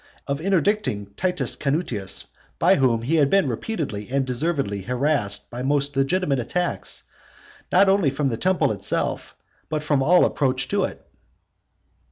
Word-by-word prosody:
of 140 +1 -3
interdicting 175 - 0
Titus 180 - 0
Canutius, 135 - -2 0.3
by - - +4
whom 120 -4 +2
he 155 +7 +1
had 145 -3 +4
been 195 -4 +3
repeatedly 125 - -4
and 135 +1 0
deservedly 130 - -1
harassed 125 -2 0
by 120 +1 -5
most 140 +1 0
legitimate 140 +1 +1
attacks, 175 +9 -2 0.7
not 195 +2 +5
only 190 -6 +3
from 140 +1 -1
the 115 - -1
temple 175 0 +1
itself 105 - -2 0.3
but 155 -1 -2
from 145 -2 +1
all 175 +6 +5
approach 135 -2 0
to 200 -2 +1
it? - - -9
140 Hz, 145 wpm, -23 LUFS, 125-175 Hz, 0.7 s, not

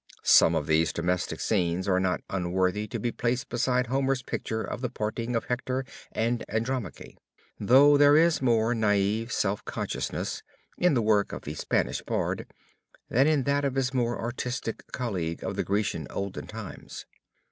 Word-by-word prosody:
Some - - +6
of - - 0
these 80 +1 +2
domestic 90 +1 -1
scenes 90 +1 0
are 95 -1 +3
not 95 -1 0
unworthy 95 +2 0
to - - -4
be 120 - -1
placed 120 +2 -2
beside 125 +1 +1
Homer's 135 +1 0
picture 110 -2 -3
of 125 - -5
the 125 - -1
parting 115 +3 -3
of 115 - 0
Hector 130 +1 -2 0.3
and 115 +2 -1
Andromache, 115 -2 -3 0.4
though 140 +7 +6
there 145 +1 +6
is 165 -1 +4
more 115 -2 +2
naive 110 +1 +1
self 100 -1 0
consciousness 65 +1 -3 0.3
in 180 -5 +2
the 120 - +2
work 105 -2 +2
of - - -6
the 75 - -5
Spanish - - -1
bard, - - -2 0.6
than 135 +5 +4
in 150 -3 +2
that 140 +1 +1
of 135 -2 -1
his 135 -1 0
more 120 -2 0
artistic 120 -1 -4
colleague 90 -10 -3
of - - -3
the - - -1
Grecian 100 -7 -1
olden 100 -1 -5
times. 110 -3 -8
115 Hz, 165 wpm, -27 LUFS, 100-130 Hz, 0.6 s, Some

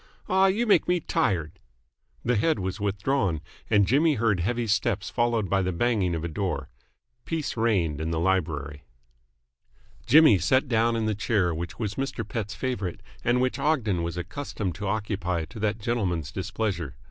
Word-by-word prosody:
Aw, 190 +1 +4
you 210 +5 +1
make 210 - +4
me 180 0 +2
tired!" 95 - -1 0.7
The 125 +1 +2
head 155 +9 +2
was 95 -1 -3
withdrawn, 100 - 0 0.3
and 105 -2 +4
Jimmy 150 - +3
heard 110 -5 +1
heavy 120 +7 0
steps 105 -1 0
followed 120 -3 +1
by 95 +1 +2
the 95 0 0
banging 95 -2 +1
of 80 - -4
a - - -1
door. 80 -5 -3 0.5
Peace 160 -3 -3
reigned 95 -10 +1
in 80 - -2
the 80 -1 -1
library. 75 -5 -1 1.3
Jimmy 150 - +7
sat 130 - +2
down 115 -1 +2
in 115 -1 0
the 110 - +1
chair 100 -4 +1
which 85 +2 -5
was 105 -3 -3
Mr. 130 -5 -3
Pett's 105 -2 -4
favourite 100 -5 -3 0.2
and 120 +1 +2
which 130 +1 0
Ogden 130 - +1
was 85 +1 -3
accustomed 95 0 -4
to 100 +3 -5
occupy 95 -6 -1
to 85 - -11
that 105 0 0
gentleman's 100 - -1
displeasure. 95 - -3
105 Hz, 170 wpm, -26 LUFS, 90-120 Hz, 1.3 s, Jimmy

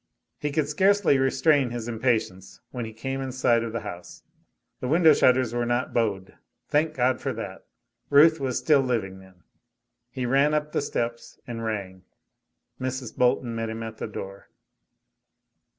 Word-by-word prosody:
He 150 - -2
could 145 0 0
scarcely 190 -1 +3
restrain 135 0 +3
his 120 -1 -5
impatience 110 -5 -2
when 125 -2 -4
he 110 - -7
came 135 +4 -4
in 135 -1 -4
sight 125 -2 +2
of 115 - -4
the 115 - -4
house. 90 0 -9 0.6
The 125 - -4
window 160 +2 +6
shutters 125 -3 +3
were 120 0 0
not 120 +1 -1
"bowed"; 100 -5 -2 0.3
thank 155 +1 +1
God, 125 0 +1
for - - -2
that. - - -8 0.4
Ruth 155 +3 +6
was 130 -3 -1
still 150 -3 +3
living, 110 -7 -2
then. 95 -2 -19 0.7
He 125 0 -4
ran 140 +4 +3
up 150 0 -1
the - - 0
steps 120 -4 -4
and 115 -1 -6
rang. 100 -4 -4 0.8
Mrs. 130 -1 -4
Bolton 125 -1 +1
met 115 0 -3
him 110 0 -5
at 110 -1 -7
the - - -4
door. 100 -2 -8
125 Hz, 165 wpm, -25 LUFS, 115-140 Hz, 0.8 s, window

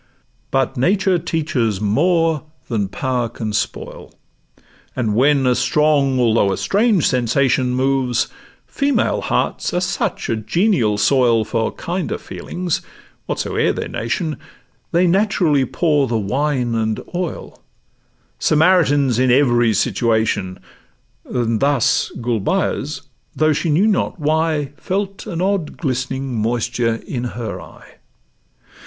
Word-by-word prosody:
But 135 0 0
nature 185 +5 +2
teaches 145 - -1
more 160 - +2 0.3
than 105 -4 0
power 120 +4 -2
can 110 -2 -5
spoil, 105 - -4 0.8
And, 115 -5 0
when 135 +4 +3
a 125 - +4
strong 140 -1 +2
although 115 -4 +3
a 95 - -1
strange 205 -4 +2
sensation 125 +1 +1
Moves—female 135 - -1
hearts - - -1
are - - +2
such 180 -1 -2
a 115 - 0
genial 115 - +1
soil 115 0 +3
For 110 +1 -1
kinder 180 +2 -3
feelings, 175 -2 -4 0.5
whatsoe'er - - 0
their - - -4
nation, 150 +7 -2 0.5
They 175 +2 +3
naturally 180 -7 +2
pour 150 0 +1
the 115 - 0
'wine 125 +3 -1
and 110 -1 -1
oil,' 180 -1 -5 0.8
Samaritans 150 -6 +3
in 130 0 +3
every 120 -4 +3
situation; 110 -6 0 0.7
And 115 -3 -1
thus 140 -4 +2
Gulbeyaz, 125 - -1 0.3
though 155 0 +3
she 165 +3 -1
knew 165 +7 +3
not 205 -3 0
why, 155 -1 0
Felt 195 +2 -3
an 175 -4 -3
odd 195 -5 -1
glistening 130 -1 -2
moisture 115 +1 0
in 125 -2 -4
her 115 -4 -5
eye. - - -15
135 Hz, 115 wpm, -19 LUFS, 115-165 Hz, 0.8 s, a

